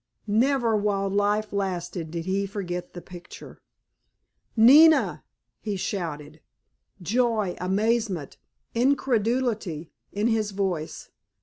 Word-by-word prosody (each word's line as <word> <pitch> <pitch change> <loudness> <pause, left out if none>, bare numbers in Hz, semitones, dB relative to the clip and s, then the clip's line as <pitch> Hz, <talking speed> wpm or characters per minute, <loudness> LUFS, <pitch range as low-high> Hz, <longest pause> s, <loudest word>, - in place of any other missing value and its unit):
Never 235 +2 +2
while 200 -2 0
life 205 +1 0
lasted 180 -4 -3
did 165 0 -5
he 195 +1 -1
forget 180 -3 -5
the 175 - -8
picture. 180 -1 -12 1.0
"Nina!" 300 +8 +6 0.4
he 210 -2 -4
shouted, 155 -5 -5 0.6
joy, 220 -2 0
amazement, 200 - -1 0.4
incredulity 230 - 0 0.2
in 205 +2 -2
his 225 -2 +1
voice. 190 -5 -4
205 Hz, 95 wpm, -25 LUFS, 180-225 Hz, 1.0 s, Nina